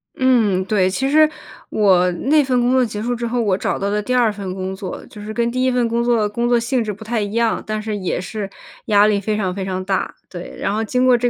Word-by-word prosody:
嗯， 225 Hz, -8 st, +3 dB
对。 190 Hz, -2 st, +2 dB
其 265 Hz, +8 st, -1 dB
实 310 Hz, +1 st, +5 dB, 0.4 s
我 185 Hz, -4 st, +3 dB
那 290 Hz, -, +2 dB
份 255 Hz, -2 st, +1 dB
工 245 Hz, +1 st, +2 dB
作 260 Hz, 0 st, +4 dB
结 210 Hz, -2 st, -5 dB
束 245 Hz, +2 st, -1 dB
之 235 Hz, 0 st, -3 dB
后， 240 Hz, +1 st, 0 dB
我 200 Hz, -4 st, +1 dB
找 -, -, -1 dB
到 200 Hz, -, -2 dB
了 210 Hz, +1 st, 0 dB
第 250 Hz, +5 st, -2 dB
2 240 Hz, -3 st, +3 dB
份 200 Hz, -3 st, -5 dB
工 190 Hz, 0 st, -4 dB
作 190 Hz, -1 st, -7 dB
就 210 Hz, -, -11 dB
是 215 Hz, +1 st, -6 dB
跟 235 Hz, +1 st, 0 dB
第 255 Hz, +1 st, -1 dB
1 260 Hz, -, +3 dB
份 245 Hz, -1 st, +1 dB
工 235 Hz, +1 st, 0 dB
作 235 Hz, -3 st, +2 dB
工 235 Hz, +3 st, -1 dB
作 240 Hz, -1 st, +4 dB
性 240 Hz, +1 st, 0 dB
质 215 Hz, -, -3 dB
不 210 Hz, +2 st, -9 dB
太 225 Hz, 0 st, -1 dB
一 205 Hz, 0 st, -3 dB
样， 230 Hz, 0 st, +1 dB
但 215 Hz, 0 st, -3 dB
是 215 Hz, 0 st, -3 dB
也 185 Hz, -3 st, -2 dB
是 200 Hz, +2 st, -5 dB, 0.4 s
压 205 Hz, 0 st, +5 dB
力 210 Hz, -1 st, +2 dB
非 210 Hz, +1 st, -1 dB
常 190 Hz, -4 st, -1 dB
非 195 Hz, +1 st, -4 dB
常 185 Hz, -1 st, -3 dB
大， 190 Hz, -1 st, -1 dB
对。 175 Hz, -1 st, -8 dB
然 -, -, -1 dB
后 220 Hz, +1 st, 0 dB
经 250 Hz, +3 st, +1 dB
过 255 Hz, -1 st, +6 dB
这 245 Hz, +1 st, +1 dB
215 Hz, 280 characters per minute, -20 LUFS, 200-240 Hz, 0.4 s, 过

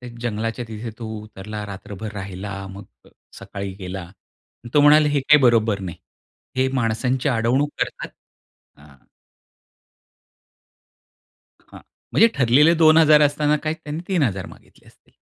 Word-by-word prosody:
त्या 125 Hz, -, -9 dB
जंगलाच्या 115 Hz, +1 st, -3 dB
तिथे 110 Hz, +1 st, -7 dB
तो 115 Hz, -, -6 dB, 0.2 s
उतरला, 105 Hz, 0 st, -8 dB
रात्रभर 100 Hz, +1 st, -8 dB
राहिला 95 Hz, 0 st, -7 dB
मग 100 Hz, +1 st, -10 dB, 0.2 s
अ, -, -, -19 dB, 0.3 s
सकाळी 100 Hz, -1 st, -7 dB
गेला. 90 Hz, -2 st, -7 dB, 0.6 s
तो 150 Hz, -, +6 dB
म्हणाला 150 Hz, +1 st, +6 dB
हे 145 Hz, -1 st, +1 dB
काही 150 Hz, +3 st, +5 dB
बरोबर 115 Hz, -4 st, +3 dB
नाही. 90 Hz, -3 st, -6 dB, 0.6 s
हे 130 Hz, 0 st, +2 dB
माणसांची 125 Hz, +3 st, 0 dB
अडवणूक 125 Hz, +4 st, +1 dB
करतात. -, -, -3 dB, 0.7 s
हां. 70 Hz, -1 st, -18 dB, 2.7 s
हां, -, -, -12 dB, 0.3 s
म्हणजे 225 Hz, -, +6 dB
ठरलेले 140 Hz, +6 st, +4 dB
2000 155 Hz, -2 st, +6 dB
असताना 150 Hz, +1 st, +2 dB
काय, 155 Hz, 0 st, -1 dB
त्यांनी 150 Hz, 0 st, -7 dB
3000 130 Hz, -, 0 dB
मागितले -, -, -18 dB
असतील. -, -, -26 dB
115 Hz, 125 wpm, -21 LUFS, 100-145 Hz, 2.7 s, तो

